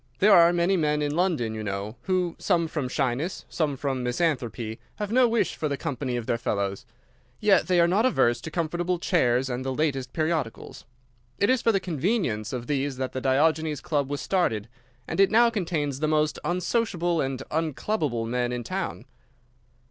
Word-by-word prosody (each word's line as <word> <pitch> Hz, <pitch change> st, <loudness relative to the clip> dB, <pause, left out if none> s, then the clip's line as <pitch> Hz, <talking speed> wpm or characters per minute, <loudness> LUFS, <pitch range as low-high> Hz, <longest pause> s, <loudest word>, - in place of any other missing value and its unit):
There 205 Hz, +1 st, +5 dB
are 170 Hz, -1 st, +7 dB
many 175 Hz, +2 st, +2 dB
men 150 Hz, -2 st, +1 dB
in 145 Hz, 0 st, -1 dB
London, 165 Hz, -11 st, 0 dB
you 110 Hz, -1 st, -5 dB
know, 100 Hz, +2 st, -4 dB
who, 180 Hz, -3 st, 0 dB
some 170 Hz, -1 st, +1 dB
from 150 Hz, -5 st, -3 dB
shyness, 130 Hz, +8 st, -2 dB
some 150 Hz, -4 st, -1 dB
from 135 Hz, -1 st, -2 dB
misanthropy, 125 Hz, -4 st, -1 dB, 0.2 s
have 210 Hz, -1 st, -4 dB
no 250 Hz, +1 st, +5 dB
wish 230 Hz, 0 st, +1 dB
for 155 Hz, -, -2 dB
the 140 Hz, -, -2 dB
company 130 Hz, -2 st, -3 dB
of 120 Hz, -, -4 dB
their 115 Hz, -, -1 dB
fellows. 100 Hz, -3 st, -2 dB, 0.5 s
Yet 210 Hz, -2 st, +4 dB
they 180 Hz, -1 st, +3 dB
are 170 Hz, -, +5 dB
not 205 Hz, +8 st, +3 dB
averse 120 Hz, -, +2 dB
to 160 Hz, -, -6 dB
comfortable 175 Hz, +2 st, -1 dB
chairs 135 Hz, -8 st, +2 dB
and 125 Hz, 0 st, -3 dB
the 135 Hz, -, -2 dB
latest 135 Hz, -3 st, -1 dB
periodicals. 155 Hz, -7 st, -3 dB, 0.5 s
It 200 Hz, -, +3 dB
is 260 Hz, -2 st, +2 dB
for 230 Hz, -, +3 dB
the 195 Hz, -, +2 dB
convenience 160 Hz, -, -1 dB
of 125 Hz, -2 st, -4 dB
these 140 Hz, 0 st, -1 dB
that 130 Hz, -1 st, -3 dB
the 130 Hz, -, -4 dB
Diogenes 150 Hz, +3 st, +2 dB
Club 145 Hz, -4 st, -1 dB
was 145 Hz, 0 st, -3 dB
started, 115 Hz, -, 0 dB, 0.4 s
and -, -, -4 dB
it 195 Hz, -1 st, +6 dB
now 235 Hz, +1 st, +5 dB
contains 160 Hz, -, -2 dB
the 155 Hz, -, 0 dB
most 150 Hz, 0 st, +1 dB
unsociable 175 Hz, -2 st, 0 dB
and 135 Hz, -1 st, -3 dB
unclubable 155 Hz, -, -1 dB
men 120 Hz, +1 st, -1 dB
in 125 Hz, -1 st, -3 dB
town. -, -, -4 dB
150 Hz, 185 wpm, -26 LUFS, 125-175 Hz, 0.5 s, are